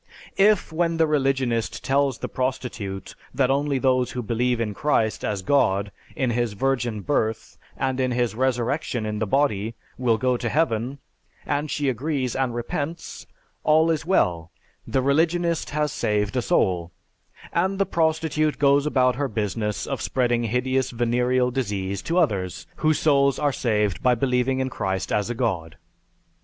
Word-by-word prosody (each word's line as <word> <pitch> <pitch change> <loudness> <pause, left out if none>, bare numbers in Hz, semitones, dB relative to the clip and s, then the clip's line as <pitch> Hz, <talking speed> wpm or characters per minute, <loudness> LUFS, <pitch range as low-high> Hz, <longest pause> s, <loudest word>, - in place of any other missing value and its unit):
If 200 -5 +4
when 165 0 +1
the 160 - +4
religionist 135 -6 0
tells 135 -2 +1
the - - -4
prostitute 125 -7 -4 0.2
that 130 -1 +2
only 140 0 +1
those 130 -2 +2
who 125 -1 -3
believe 120 +2 0
in 110 -3 -1
Christ 110 -3 0
as 100 -3 -2
God, 100 -6 +2 0.2
in 130 -6 0
His 120 -2 0
Virgin 120 -2 -1
Birth, 110 -4 -2 0.2
and 130 -1 -1
in 130 -1 +1
His 120 -3 0
Resurrection 125 0 -1
in 105 0 -3
the 110 - -1
Body, 115 -4 +1 0.2
will 120 -3 +2
go 125 +2 +1
to - - -2
heaven, 130 -4 0 0.5
and 145 +1 -1
she 145 0 -1
agrees 130 0 -1
and 130 -3 -1
repents 145 +7 -5 0.4
all 160 +2 +4
is 160 - -1
well; 85 - +1 0.4
the 130 - 0
religionist 165 +4 +1
has 150 0 0
saved 105 -2 -1
a 125 - +2
soul, 90 -6 +1 0.6
and 190 +3 +1
the 195 - +2
prostitute 160 -2 0
goes 140 +1 +3
about 125 -4 +2
her 140 0 0
business 105 -2 -2
of - - -4
spreading 120 -2 0
hideous 130 +3 0
venereal 125 +1 +1
disease 100 -6 -2
to 170 - -2
others 100 - 0
whose 155 -1 +2
souls 140 -3 +3
are 145 -2 +1
saved 105 -7 0
by 125 -1 +4
believing 125 +1 +1
in 130 - -1
Christ 95 -2 -2
as 105 +1 0
a 120 - -2
God. 85 - -2
125 Hz, 160 wpm, -24 LUFS, 110-145 Hz, 0.6 s, If